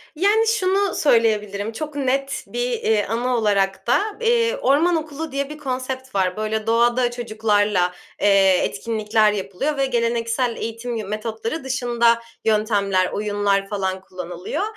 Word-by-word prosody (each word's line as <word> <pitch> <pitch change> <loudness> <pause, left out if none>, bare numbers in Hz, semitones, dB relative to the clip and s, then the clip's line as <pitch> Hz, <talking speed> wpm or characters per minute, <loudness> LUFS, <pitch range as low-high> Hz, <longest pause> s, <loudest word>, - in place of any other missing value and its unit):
Yani, 420 +7 +3
şunu 395 -3 +1
söyleyebilirim, 215 -5 +1
çok 300 +4 -6
net 275 0 -1
bir, - - -2
eee, 220 - +1
anı 245 +3 -1
olarak 200 -2 0
da, 245 - +4 0.2
eee, 465 +1 +2
orman 335 - +3
okulu 310 -1 -4
diye 280 +1 -2
bir 300 - -8
konsept 260 -2 -5
var. 185 0 +1
Böyle, 215 0 -2
doğada 240 +2 +3
çocuklarla, 210 -6 +1 0.3
eee, 195 -2 +5
etkinlikler 215 - +1
yapılıyor 205 +9 -3
ve 275 - +2
geleneksel 235 0 0
eğitim 230 +2 -4
yı 215 -3 -4
metotları 225 +7 -4
dışında 240 -3 +2 0.3
yöntemler, 205 -4 +2
oyunlar 205 -1 0
falan 190 -2 -2
kullanılıyor. 180 - -5
230 Hz, 135 wpm, -21 LUFS, 205-275 Hz, 0.3 s, eee